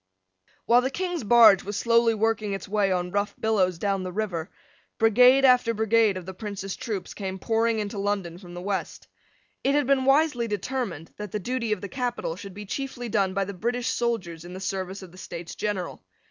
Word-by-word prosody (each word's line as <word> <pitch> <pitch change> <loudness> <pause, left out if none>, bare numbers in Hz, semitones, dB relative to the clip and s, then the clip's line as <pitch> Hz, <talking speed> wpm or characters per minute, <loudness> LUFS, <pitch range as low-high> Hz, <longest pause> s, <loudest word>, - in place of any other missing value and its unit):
While 240 +1 +5
the 260 - -1
King's 355 +2 -3
barge 215 -3 +7
was 205 +1 -4
slowly 230 0 +3
working 220 -1 0
its 195 - -5
way 200 -1 +1
on 180 -1 -1
rough 205 +1 -1
billows 190 -5 +1
down 195 +1 -1
the 185 0 -4
river, 180 -5 -3 0.5
brigade 250 +5 +6
after 250 -3 +4
brigade 220 -2 +3
of 180 - -7
the 190 - -7
Prince's 195 -1 -5
troops 210 -5 -5
came 190 -2 -5
pouring 225 +3 +1
into 205 -1 -3
London 195 -4 -2
from 175 -2 -11
the 175 - -6
west. 200 0 -3 0.6
It 275 +1 +2
had 290 -1 +2
been 270 0 +2
wisely 270 -4 +3
determined 205 - -4
that 210 -2 -6
the 210 - -2
duty 235 +2 -2
of 210 - 0
the 200 - -5
capital 245 -7 -3
should 195 0 -10
be 210 0 -7
chiefly 245 +2 -4
done 195 -4 +1
by 195 0 +1
the 200 - -6
British 240 +6 -2
soldiers 190 -9 -2
in 175 +1 -9
the - - -6
service 190 0 -4
of 180 - -11
the 185 - -14
States 170 -2 -7
General. 200 -4 -3
210 Hz, 200 wpm, -26 LUFS, 190-235 Hz, 0.6 s, barge